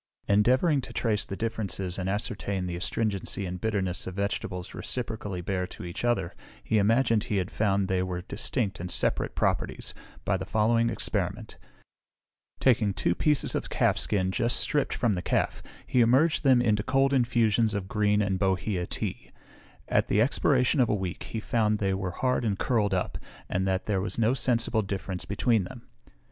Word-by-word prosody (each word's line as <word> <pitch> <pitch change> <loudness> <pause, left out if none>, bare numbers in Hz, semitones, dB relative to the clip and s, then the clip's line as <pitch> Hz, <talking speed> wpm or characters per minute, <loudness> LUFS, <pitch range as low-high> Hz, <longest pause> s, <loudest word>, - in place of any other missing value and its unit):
Endeavouring 130 - +3
to 125 - -8
trace 110 -3 0
the 95 - -5
differences 100 -4 -3
and 95 0 -2
ascertain 100 -2 -2
the 90 -1 -3
astringency 100 +1 -1
and 90 0 -5
bitterness 95 -5 -1
of 95 - -6
vegetables 95 -2 -3
reciprocally 105 -7 -3
bear 90 0 -2
to 90 - -9
each 85 +5 -6
other, 115 -8 0 0.3
he 110 - +2
imagined 115 +1 +3
he 110 -5 -1
had 95 0 -2
found 100 -2 +1
they 95 -1 +1
were 90 -1 -3
distinct 105 +1 -2
and 90 +1 -5
separate - - 0
properties, - - -1 0.3
by 100 - +1
the 95 - -5
following 115 +3 +2
experiment: - - -3 1.0
Taking 110 -6 +3
two 85 - +1
pieces 150 - +1
of - - -3
calf - - +2
skin 95 -3 0
just 115 +5 +3
stripped 145 -2 0
from 115 -4 +1
the 90 - -2
calf, - - 0 0.2
he 125 - +1
immerged 130 +8 +4
them 130 -3 +5
in 110 -3 +3
cold 135 +6 +2
infusions 115 -4 +2
of 95 -2 -3
green 105 +1 +2
and 95 -2 -1
bohea 95 -1 0
tea; - - -4 0.6
at - - +2
the 105 - +2
expiration 130 +3 +2
of 125 - +4
a - - +2
week 95 -3 -4
he 110 - -4
found 110 -1 +1
they 95 -2 0
were 95 -1 -2
hard 125 +8 0
and 105 -4 0
curled 105 -6 +1
up, 90 - -2 0.3
and 95 +1 -1
that 95 0 0
there 100 -3 0
was 100 - -3
no 115 +1 +3
sensible 120 -3 +1
difference 95 -2 -4
between 105 0 +1
them. - - -10
105 Hz, 180 wpm, -27 LUFS, 95-115 Hz, 1.0 s, them